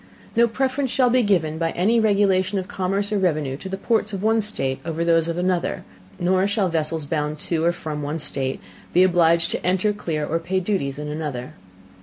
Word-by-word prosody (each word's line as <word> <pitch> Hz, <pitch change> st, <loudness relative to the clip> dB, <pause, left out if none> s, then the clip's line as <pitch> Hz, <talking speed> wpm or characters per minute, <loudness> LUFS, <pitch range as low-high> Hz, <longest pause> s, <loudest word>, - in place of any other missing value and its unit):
No 235 Hz, +1 st, +5 dB
Preference 265 Hz, +3 st, -1 dB
shall 250 Hz, -1 st, +3 dB
be 255 Hz, +1 st, +4 dB
given 165 Hz, -7 st, +1 dB
by 165 Hz, -1 st, +1 dB
any 220 Hz, +7 st, +2 dB
Regulation 200 Hz, -2 st, +2 dB
of 185 Hz, -1 st, -3 dB
Commerce 195 Hz, +2 st, -1 dB
or 205 Hz, -, +2 dB
Revenue 155 Hz, -7 st, 0 dB
to 190 Hz, -, -8 dB
the 195 Hz, -, -3 dB
Ports 215 Hz, 0 st, 0 dB
of 195 Hz, 0 st, -4 dB
one 225 Hz, +1 st, +3 dB
State 135 Hz, -11 st, -2 dB
over 165 Hz, 0 st, -2 dB
those 165 Hz, -1 st, +3 dB
of 170 Hz, 0 st, -2 dB
another: 180 Hz, -1 st, -1 dB, 0.4 s
nor 185 Hz, +2 st, +2 dB
shall 200 Hz, -2 st, +1 dB
Vessels 160 Hz, -1 st, -1 dB
bound 150 Hz, 0 st, -2 dB
to, 165 Hz, -2 st, -1 dB
or 170 Hz, -, +4 dB
from, 155 Hz, -3 st, -5 dB
one 145 Hz, +2 st, -3 dB
State, 135 Hz, -3 st, -2 dB, 0.3 s
be 180 Hz, -, +6 dB
obliged 170 Hz, -2 st, +3 dB
to -, -, -3 dB
enter, 190 Hz, +3 st, +1 dB
clear, 160 Hz, -7 st, -3 dB
or 165 Hz, +3 st, -1 dB
pay 180 Hz, +3 st, -1 dB
Duties 175 Hz, -8 st, -2 dB
in 150 Hz, 0 st, -5 dB
another. 150 Hz, -5 st, -5 dB
175 Hz, 205 wpm, -23 LUFS, 160-205 Hz, 0.4 s, be